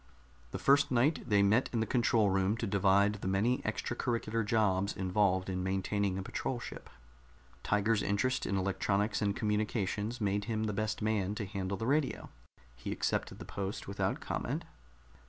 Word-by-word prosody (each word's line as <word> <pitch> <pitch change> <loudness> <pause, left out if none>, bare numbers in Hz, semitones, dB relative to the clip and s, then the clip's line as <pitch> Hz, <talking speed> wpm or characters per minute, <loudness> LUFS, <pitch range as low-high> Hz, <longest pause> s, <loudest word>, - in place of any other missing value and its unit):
The - - -4
first 140 +1 +4
night 125 +2 +1
they 100 -1 +5
met 110 +6 +3
in 115 - 0
the 110 - +1
control 115 -4 +2
room 95 +3 +1
to 115 - -2
divide 100 0 +3
the - - -3
many 105 +7 +2
extracurricular 115 0 -2
jobs 105 -3 +1
involved 95 0 +1
in 95 -1 -2
maintaining 95 +1 0
a 95 - -3
patrol 125 +5 -3
ship. - - -8 0.7
Tiger's 105 +1 +1
interest 130 +6 0
in 100 - 0
electronics 100 +3 0
and 100 -1 +1
communications 105 +1 -1
made 100 -1 0
him 110 -1 -1
the 105 -1 -1
best 110 +1 -2
man 105 -2 0
to 105 - -3
handle 95 -1 -3
the 115 - -3
radio; 140 +2 0 0.5
he - - -6
accepted - - -1
the - - -9
post 100 +1 -5
without 95 -1 -1
comment. - - -3
105 Hz, 165 wpm, -32 LUFS, 95-115 Hz, 0.7 s, they